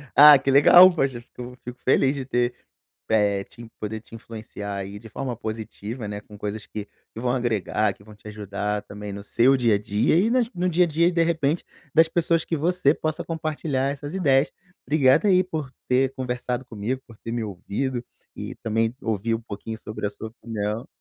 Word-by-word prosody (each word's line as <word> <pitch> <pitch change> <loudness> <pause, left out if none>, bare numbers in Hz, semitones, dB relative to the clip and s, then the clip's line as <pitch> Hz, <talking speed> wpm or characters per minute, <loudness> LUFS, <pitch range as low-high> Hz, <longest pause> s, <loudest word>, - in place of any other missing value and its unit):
Ah, 145 0 +10
que 135 +1 0
legal! 175 +6 +8
Poxa, 135 -7 0
fico 125 +1 -10
fico 125 0 -8
feliz 135 +1 +3
de 135 - -4
ter 120 -1 0 0.6
eh, 100 -2 +2
te 120 +3 -13
poder 110 +1 -4
te 115 - -21
influenciar 110 -3 -7
aí 100 +1 -6
de 115 +1 -12
forma 125 +3 -4
positiva, 110 0 -6
né, 105 0 -5
com 105 0 -14
coisas 105 +1 -5
que 105 -1 -6 0.3
que - - -7
vão 125 +1 0
agregar, 110 -4 0
que 100 - -20
vão 105 - -14
te 105 - -14
ajudar 105 0 -3
também, 105 0 -8
no 100 0 -7
seu 130 +6 +3
dia 115 -4 +3
a 100 - 0
dia 105 +7 +1
e 200 +7 +4
nas 245 -1 +2
no 180 +1 0
dia 180 +1 +4
a - - -3
dia, 170 +3 +2
de 170 -1 +2
repente, 160 -1 0 0.3
das 160 +1 +6
pessoas 165 0 +1
que 165 - -1
você 165 -1 +2
possa 155 -1 -3
compartilhar 155 -4 -2
essas 145 +2 -6
ideias. 145 -6 +3 0.3
Obrigado 145 +3 +4
aí 185 -2 +5
por 155 -7 -5 0.2
ter 130 +1 +2
conversado 125 -1 -3
comigo, 120 +3 -4
por 115 - -15
ter 115 - -7
me 120 -1 -2
ouvido 110 +6 -3 0.3
e - - -6
também 115 +2 -1
ouvir 110 0 -1
um 115 - -6
pouquinho 110 0 -7
sobre 110 -1 -6
a 100 - +1
sua 110 - -8
opinião. 110 0 -4
120 Hz, 200 wpm, -24 LUFS, 105-145 Hz, 0.6 s, Ah